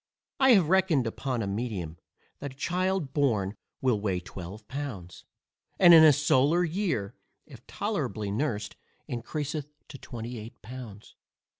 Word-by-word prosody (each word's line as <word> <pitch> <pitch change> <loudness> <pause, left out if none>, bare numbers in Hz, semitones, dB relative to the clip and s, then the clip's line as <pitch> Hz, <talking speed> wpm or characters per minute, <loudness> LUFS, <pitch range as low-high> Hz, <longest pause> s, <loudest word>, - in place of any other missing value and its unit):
I 265 -2 +7
have 190 -8 +5
reckoned 185 -8 +3
upon 120 +1 -2
a - - -3
medium, 100 -6 -4 0.4
that 140 -2 -6
a - - -24
child 185 +3 0
just 135 -1 -12
born 110 -9 +1 0.3
will 125 -6 +1
weigh 95 -4 0
12 95 +4 -9
pounds, 120 -11 -7 0.5
and 175 -2 +8
in 160 -1 +10
a 155 - +9
solar 150 +3 +3
year, 165 - -1 0.3
if - - -15
tolerably 105 -2 -3
nursed, 105 -3 -2 0.3
encreaseth 145 +4 -4 0.2
to 135 - -10
28 115 -1 -8
pounds. 110 -3 -10
130 Hz, 140 wpm, -28 LUFS, 105-155 Hz, 0.5 s, in